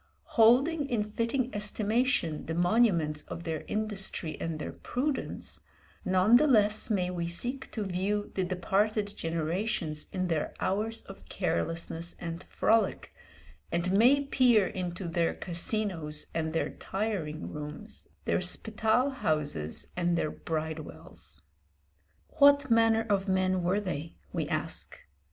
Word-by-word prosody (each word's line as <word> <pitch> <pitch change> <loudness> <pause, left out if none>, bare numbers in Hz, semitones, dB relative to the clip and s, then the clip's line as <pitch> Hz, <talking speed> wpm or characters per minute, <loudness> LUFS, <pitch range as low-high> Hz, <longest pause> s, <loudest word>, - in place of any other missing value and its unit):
Holding 275 +7 +4
in 225 -4 +1
fitting 230 +4 -1
estimation 210 - +1
the 160 - -2
monuments 175 -5 +3
of 170 - -6
their 160 -2 -3
industry 205 -6 -3
and 165 -1 -2
their 150 - -5
prudence, 265 +2 -3 0.4
none 190 +5 +5
the 305 +4 +3
less 215 -4 +3
may 180 -4 +1
we 170 -2 -2
seek 245 +10 -2
to 215 - -2
view 195 +3 -1
the 190 - 0
departed 200 +3 0
generations 165 -1 -2
in 185 -1 -1
their 160 -3 -1
hours 220 +4 -1
of 195 - -13
carelessness 170 -1 -2
and 165 0 -5
frolic, 225 +3 +1 0.6
and 170 +2 0
may 245 +8 +5
peer 250 -7 +4
into 180 0 -4
their 170 0 0
casinos 170 -4 -1
and 160 -1 -1
their 165 - -1
tiring 190 -7 -3
rooms, 150 +8 -7 0.2
their - - +1
spital 220 +7 +2
houses 150 - -1
and 175 -1 +1
their 155 - 0
bridewells. 160 -1 -5 1.0
What 285 -2 +6
manner 225 0 +4
of 200 -1 +1
men 185 -1 +2
were 180 +4 +1
they? 165 -5 -4 0.2
we - - -1
ask. - - -3
190 Hz, 130 wpm, -30 LUFS, 165-225 Hz, 1.0 s, What